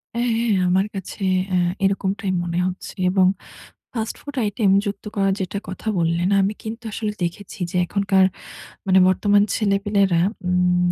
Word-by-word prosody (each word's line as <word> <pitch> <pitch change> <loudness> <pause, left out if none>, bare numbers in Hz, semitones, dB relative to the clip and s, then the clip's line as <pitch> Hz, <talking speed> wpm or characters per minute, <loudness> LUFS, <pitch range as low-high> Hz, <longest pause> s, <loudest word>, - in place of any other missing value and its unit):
অ্যা 240 +1 0
হ্যাঁ, 230 -3 +1
আমার 190 +3 +2
কাছে 195 +1 -6 0.3
এ - - +3 0.3
এরকমটাই 195 0 0
মনে 175 0 -2
হচ্ছে 185 +1 -6 0.2
এবং 190 -1 +4 0.7
ফাস্ট-ফুড 240 +5 -5
আইটেম 205 -1 +1 0.2
যুক্ত 200 +1 -5
করা 195 -1 +2
যেটা 195 +1 -3
কথা 190 +4 -8
বললেন 170 +2 +1
আমি 195 +2 +1
কিন্তু 225 +2 -6
আসলে 210 0 -2
দেখেছি 180 +3 -5
যে - - -7
এখনকার 195 0 +2 0.6
মানে 190 0 +5
বর্তমান 205 +2 +3
ছেলে-পিলেরা 200 -4 +2 0.3
উম 180 0 +2
195 Hz, 145 wpm, -22 LUFS, 185-205 Hz, 0.7 s, মানে